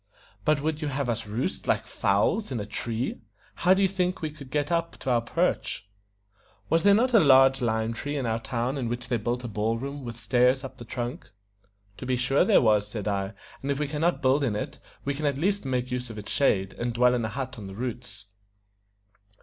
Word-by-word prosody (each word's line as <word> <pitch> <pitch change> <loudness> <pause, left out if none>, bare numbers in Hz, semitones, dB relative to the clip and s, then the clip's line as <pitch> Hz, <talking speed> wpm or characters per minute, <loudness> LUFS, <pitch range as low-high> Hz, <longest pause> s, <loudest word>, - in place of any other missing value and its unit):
"But 155 -2 +3
would 155 0 -1
you 155 - -1
have 140 -2 -1
us 115 -1 -2
roost, 105 - -3
like - - +1
fowls, 105 - +1
in 125 - -2
a 100 - -3
tree? 115 +4 -3 0.3
How 185 +2 +4
do 195 - +2
you - - +5
think 185 -1 -1
we 155 -2 -3
could 145 -3 -12
get 145 +3 -1
up 170 0 0
to 130 - -1
our 120 -1 +3
perch?" 115 -3 -1 0.8
"Was 165 0 +4
there 200 +2 +6
not 245 +4 +2
a 225 - +8
large 135 -3 +6
lime 110 -1 0
tree 145 +5 -4
in 135 - -2
our 115 0 0
town 125 +3 -2
in 120 -3 -2
which 120 +1 -4
they 120 - +2
built 120 +3 -2
a - - -3
ball 110 +1 -1
room, 140 +3 -5
with 120 -2 -6
stairs 125 +4 +3
up 135 - -8
the 120 - -8
trunk?" 120 +1 -5 0.7
"To 130 - -7
be 130 - +2
sure 125 +3 +3
there - - +5
was," 105 -2 +3
said 105 -1 -5
I; 100 0 -1 0.3
"and 135 - -4
if 140 - +1
we 150 0 -1
can 150 +1 -4
not 175 -1 +1
build 135 +2 +3
in 115 -6 0
it, 105 - -4 0.3
we 140 - 0
can 150 +2 -2
at 140 -2 0
least 195 +3 0
make 125 -1 -1
use 125 -1 -3
of 110 - -8
its 105 - -6
shade, 95 -9 +2
and 120 0 -3
dwell 125 +1 +5
in 120 -2 0
a 110 - -1
hut 130 +1 -5
on 100 - -7
the 95 - -8
roots." 120 -3 -6
125 Hz, 235 wpm, -27 LUFS, 115-145 Hz, 0.8 s, a